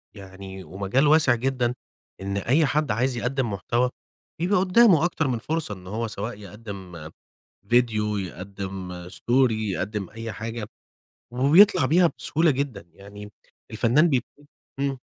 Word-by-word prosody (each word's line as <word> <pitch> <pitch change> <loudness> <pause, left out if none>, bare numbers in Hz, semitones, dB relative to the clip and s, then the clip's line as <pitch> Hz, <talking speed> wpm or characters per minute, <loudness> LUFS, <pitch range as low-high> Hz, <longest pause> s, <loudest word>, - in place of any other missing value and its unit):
يعني 95 -1 -10
ومجال 100 - 0
واسع 150 -5 +5
جدًا 125 0 -1 0.5
إن 100 +1 -3
أي 135 - +2
حد 150 0 0
عايز 125 +3 0
يقدِّم 125 -1 -1
محتوى 120 +6 0 0.5
يبقى 180 +2 +2
قُدَّامه 185 -2 +5
أكتر 160 -3 0
من 120 -3 -1
فرصة 155 -3 -3
إن 90 -1 -14
هو 110 +4 -3
سواء 105 +2 -5
يقدِّم 95 -6 -9 0.6
فيديو، 110 -3 +2
يقدِّم 95 -1 -6
story 125 +6 +2
يقدِّم 105 -1 -3
أي 115 +1 -6
حاجة، 110 +2 -5 0.7
وبيطلع 155 - +5
بيها 170 +4 +4
بسهولة 160 +1 +2
جدًا 130 - -3
يعني 105 +2 -11 0.4
الفنان 120 +9 +3
بيب 130 -3 +1 0.6
إمم. 140 -1 -1
115 Hz, 130 wpm, -24 LUFS, 100-135 Hz, 0.7 s, واسع